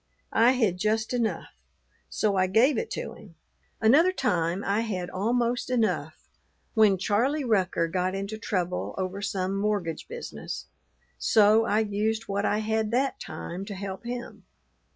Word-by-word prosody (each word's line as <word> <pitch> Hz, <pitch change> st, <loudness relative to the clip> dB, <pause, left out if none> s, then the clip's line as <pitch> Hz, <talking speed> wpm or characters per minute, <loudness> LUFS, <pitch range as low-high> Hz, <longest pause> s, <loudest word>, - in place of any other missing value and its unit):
I 235 Hz, +3 st, +5 dB
had 220 Hz, -8 st, +1 dB
just 220 Hz, +3 st, 0 dB
enough; 235 Hz, -3 st, -2 dB, 0.6 s
so 205 Hz, -2 st, 0 dB
I 185 Hz, -1 st, +3 dB
gave 230 Hz, +10 st, +4 dB
it 460 Hz, -, -4 dB
to -, -, -5 dB
him. 175 Hz, -5 st, -15 dB, 0.4 s
Another 290 Hz, +12 st, +5 dB
time 185 Hz, -, 0 dB
I 200 Hz, +2 st, +1 dB
had 185 Hz, -6 st, -3 dB
almost 235 Hz, +5 st, 0 dB
enough, 185 Hz, -, -1 dB, 0.5 s
when 215 Hz, -4 st, +5 dB
Charlie 245 Hz, +10 st, +1 dB
Rucker 190 Hz, -7 st, +1 dB
got 185 Hz, +2 st, -1 dB
into 200 Hz, +3 st, -4 dB
trouble 180 Hz, -5 st, -2 dB
over 190 Hz, +1 st, -3 dB
some 195 Hz, -1 st, -1 dB
mortgage 195 Hz, -6 st, -1 dB
business; 475 Hz, +1 st, -6 dB, 0.5 s
so 220 Hz, +1 st, +5 dB
I 215 Hz, -1 st, +2 dB
used 220 Hz, +1 st, -1 dB
what 200 Hz, 0 st, -2 dB
I 205 Hz, -, +2 dB
had 220 Hz, 0 st, 0 dB
that 260 Hz, +4 st, 0 dB
time 180 Hz, +3 st, -6 dB
to 200 Hz, -1 st, -6 dB
help 190 Hz, +1 st, -6 dB
him. 240 Hz, +1 st, -6 dB
210 Hz, 150 wpm, -27 LUFS, 190-230 Hz, 0.6 s, I